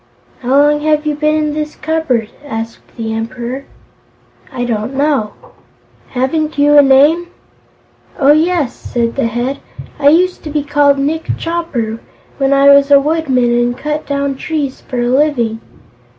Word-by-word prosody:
"How 245 - -6
long 295 +1 +3
have 305 0 0
you 300 - 0
been 305 +1 0
in 305 -1 -1
this 305 0 -4
cupboard?" 305 -9 -1
asked 230 -5 -7
the 225 -1 -3
Emperor. 240 +4 -5 0.9
"I 245 - -3
don't 230 +2 -3
know." 275 -7 0 0.7
"Haven't 300 +5 -2
you 290 +1 +4
a 290 - +9
name?" 285 +6 +4 0.9
"Oh, 280 -2 +4
yes," 315 -3 +1
said 235 -1 -3
the 275 -4 0
Head; 245 +4 -3 0.4
"I 285 - +2
used 360 +4 +2
to - - -4
be 295 -1 -1
called 285 -1 +2
Nick 305 +4 -2
Chopper, 285 -10 -3 0.4
when 270 0 +1
I 275 0 +6
was 280 0 +5
a 280 -1 +7
woodman 275 -5 +1
and 240 0 0
cut 300 +1 -4
down 280 -1 -2
trees 290 -3 -3
for 250 - -5
a - - 0
living." 250 -4 +1
280 Hz, 155 wpm, -14 LUFS, 245-300 Hz, 0.9 s, a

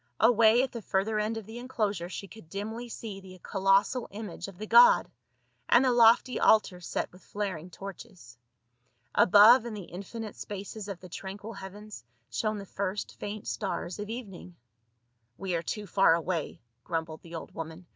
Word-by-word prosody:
Away 230 +1 +5
at 265 - -3
the 235 - -6
further 210 +2 0
end 215 +2 -1
of 220 - -6
the 225 +3 -8
enclosure 210 -8 -2
she 195 - -6
could 210 -5 -14
dimly 220 +5 -5
see 215 -3 -7
the 185 -1 -13
colossal 195 +5 +2
image 200 -4 -7
of 195 -3 -11
the 215 - -5
god, 485 - +6 0.6
and 240 +2 +6
the 255 - +4
lofty 240 +1 +5
altar 210 -4 +4
set - - -3
with 180 - -17
flaring 185 -5 -4
torches. 180 -8 -10 0.8
Above 215 +6 +7
in 235 -2 -6
the 200 - -6
infinite 200 +5 -7
spaces 205 +1 -7
of 195 -3 -6
the 185 - -10
tranquil 200 +5 -7
heavens 205 - -9 0.3
shone 215 -1 -1
the 200 - -7
first 195 +1 -4
faint 205 0 -6
stars 180 -2 -3
of 210 0 -5
evening. 195 -7 -8 0.8
"We 190 -2 -3
are 165 - 0
too 210 +4 -4
far 190 -4 +4
away," 170 -1 -3 0.2
grumbled 160 -2 -4
the 170 0 -10
old 165 - -8
woman. 165 +2 -7
200 Hz, 170 wpm, -29 LUFS, 185-220 Hz, 0.8 s, Above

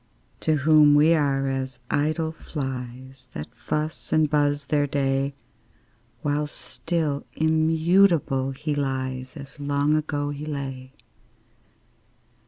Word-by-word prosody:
To 155 - +1
whom 150 0 +6
we 155 +3 +6
are 140 -3 +1
as 130 -1 -3
idle 155 +2 0
flies, 130 -4 -7
That 75 +10 -7
fuss 150 +6 -4
and 155 -1 +4
buzz 145 -1 +1
their 145 0 +1
day; 135 0 0 0.9
While 150 0 0
still 155 -1 -3
immutable 160 -2 +3
he 150 +3 -3
lies, 130 -1 -3
As 140 +1 -11
long 145 +1 +1
ago 145 -1 -1
he 145 +1 -6
lay. 135 -3 -5
145 Hz, 110 wpm, -25 LUFS, 135-155 Hz, 0.9 s, whom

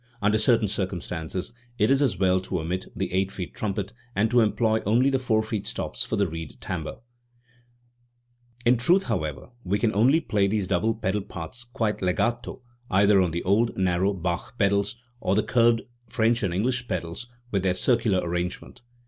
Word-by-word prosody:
Under 105 +1 +2
certain 110 -1 +3
circum 95 -2 -2
stances 85 +3 -5 0.2
it 105 +4 +3
is 135 +1 +4
as 120 -10 +2
well 95 0 +3
to 95 -1 -3
omit 90 +4 -3
the 95 -2 -3
eight 95 +1 +1
feet 90 -3 -6
trumpet, 100 -1 -3 0.2
and 110 +4 +2
to 125 - +5
employ 110 0 +2
only 120 +7 +3
the 135 - +2
four 110 -4 +1
feet 110 -2 -3
stops - - -3
for - - -2
the 100 -1 +2
reed 80 -2 -7
timbre. - - -4 1.7
In 120 +1 +5
truth, 175 +11 +3
however, 80 - -3
we 95 +2 0
can 110 +1 +1
only 125 +10 +4
play 105 -10 +1
these 105 -1 0
double 110 +6 +1
pedal 105 -2 -1
parts 95 +7 -7
quite 115 -3 -2
legato 115 +7 -1 0.3
either 100 0 +5
on 90 - +2
the 85 +1 -3
old 110 +5 +2
narrow 95 +1 +2
Bach 90 +4 -3
pedals 100 +1 +1 0.2
or 95 - +1
the 105 - +3
curved 115 -1 +3 0.3
French 115 +1 +2
and 95 -5 0
English 120 +7 -1
pedals 85 +7 -4 0.2
with 100 - +1
their 90 -1 +1
circular 110 -5 +2
arrange 90 +1 -2
ment. - - -15
100 Hz, 180 wpm, -26 LUFS, 95-115 Hz, 1.7 s, to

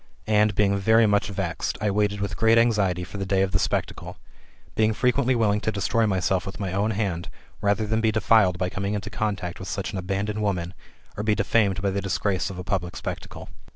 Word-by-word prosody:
And, 105 -1 +3
being 100 -1 +3
very 110 +3 +4
much 105 -1 +2
vexed, 100 - -3
I 105 -1 0
waited 105 0 0
with 100 -4 -2
great 110 +3 +4
anxiety 100 -6 +2
for 95 +3 -8
the - - -1
day 95 -1 +2
of 95 - -1
the - - +1
spectacle; - - -2 0.6
being 110 0 +2
frequently 125 +2 +2
willing 105 -3 +2
to 110 - -1
destroy 110 +2 +1
myself 95 -1 0
with 95 -2 -7
my 95 -3 -3
own 100 +3 +1
hand, 95 -6 -2 0.3
rather 100 +1 +1
than 110 +1 0
be 110 -1 +2
defiled 110 -4 +3
by 90 0 -1
coming 100 +2 -3
into 105 - -5
contact 95 -4 -3
with 95 - -7
such 95 +3 -3
an 100 - -4
abandoned 100 +3 -2
woman, 90 -4 -1 0.4
or - - -2
be 105 -1 +2
defamed 100 -5 +1
by 100 - +1
the 100 +1 -2
disgrace 95 -2 -1
of 95 - -8
a 90 - -5
public 90 -2 -2
spectacle. - - -7
100 Hz, 215 wpm, -25 LUFS, 95-110 Hz, 0.6 s, very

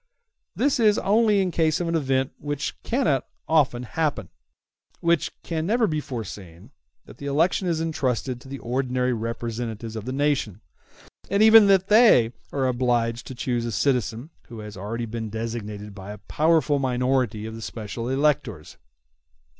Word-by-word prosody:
] - - -57
Thus 280 -2 +1
it 225 - +5
is 210 - +4
only 210 0 +3
in 185 - -1
case 160 -2 +1
of 175 - -2
an 165 - -1
event 135 -4 0
which 145 -1 -3
cannot 165 - 0 0.2
often 140 -6 +2
happen, 145 - -2
and - - -41 0.7
which 170 -2 +1
can 160 -1 -3
never 230 +2 +3
be 155 -6 -1
foreseen, 100 - -8 0.3
that - - -15
the 140 - -6
election 165 +6 +1
is 165 -2 0
entrusted 130 -6 -2
to - - -14
the 140 +1 -6
ordinary 125 0 -1
representatives 115 -1 -4
of 110 -1 -6
the 130 - -3
nation; 135 -8 -1 0.7
and 200 +2 +3
even 220 -1 +8
then 195 -2 +5
they 210 - +6 0.2
are 135 -2 0
obliged 120 -2 0
to 130 - -7
choose 120 -1 -1
a 115 - -3
citizen 120 - -1 0.2
who 115 - -10
has 105 0 -9
already 115 +5 -4
been 110 0 -5
designated 105 -2 -5
by 100 0 -9
a 105 - -8
powerful 155 +4 +1
minority 125 -4 0
of 110 - -6
the 115 - -8
special 110 +2 -5
electors. 135 - -1
130 Hz, 170 wpm, -24 LUFS, 115-155 Hz, 0.7 s, even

